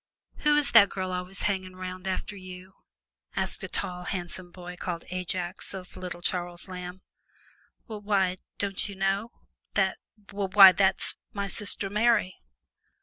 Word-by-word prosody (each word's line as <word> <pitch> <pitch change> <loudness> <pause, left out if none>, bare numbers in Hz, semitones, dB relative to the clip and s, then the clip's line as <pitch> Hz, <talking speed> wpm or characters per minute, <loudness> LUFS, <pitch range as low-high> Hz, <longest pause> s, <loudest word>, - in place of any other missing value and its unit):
"Who 300 0 +4
is 295 - +3
that 205 -3 +8
girl 185 -1 -3
always 180 +2 -4
hanging 190 -2 -1
'round 185 0 -6
after 190 +2 -2
you?" 185 0 -10 0.6
asked - - 0
a - - -3
tall, 180 0 -2
handsome 175 0 -4
boy, 180 0 -9
called 175 -1 -4
Ajax, 185 +1 -3
of 185 -1 -9
little 180 -1 -6
Charles 175 0 -2
Lamb. 180 0 -7 0.8
"Wh' 215 -2 -7
why, 190 -3 +2 0.2
don't 200 0 -1
you 200 - -7
know 195 +3 0 0.5
that, 195 -2 +2 0.3
wh' 200 -1 -2
why 195 -2 +12
that's 190 +1 +1 0.2
my 200 -1 -2
sister 200 0 -1
Mary!" 210 -3 +3
185 Hz, 145 wpm, -28 LUFS, 180-200 Hz, 0.8 s, why